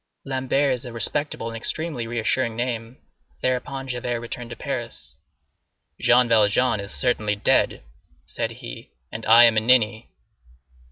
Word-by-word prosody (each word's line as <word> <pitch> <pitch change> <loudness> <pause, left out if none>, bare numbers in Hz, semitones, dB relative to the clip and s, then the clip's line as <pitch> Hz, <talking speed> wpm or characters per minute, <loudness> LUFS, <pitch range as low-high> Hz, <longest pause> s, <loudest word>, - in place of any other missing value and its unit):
Lambert 135 +1 0
is 125 +1 -5
a 125 - -7
respectable 115 +3 0
and 115 - -7
extremely 130 +1 -3
reassuring 115 0 0
name. 120 0 -4 0.5
Thereupon 135 +1 -2
Javert 125 -1 -3
returned 120 +1 -7
to - - -7
Paris. - - -6 0.8
"Jean 125 0 +4
Valjean 110 +1 +3
is 100 0 -6
certainly 105 -5 0
dead," 100 - +1 0.4
said - - -3
he, - - -9 0.2
"and 115 - -7
I 115 +2 +8
am 115 -2 +5
a - - +7
ninny." 110 -1 +2
120 Hz, 135 wpm, -23 LUFS, 115-130 Hz, 0.8 s, I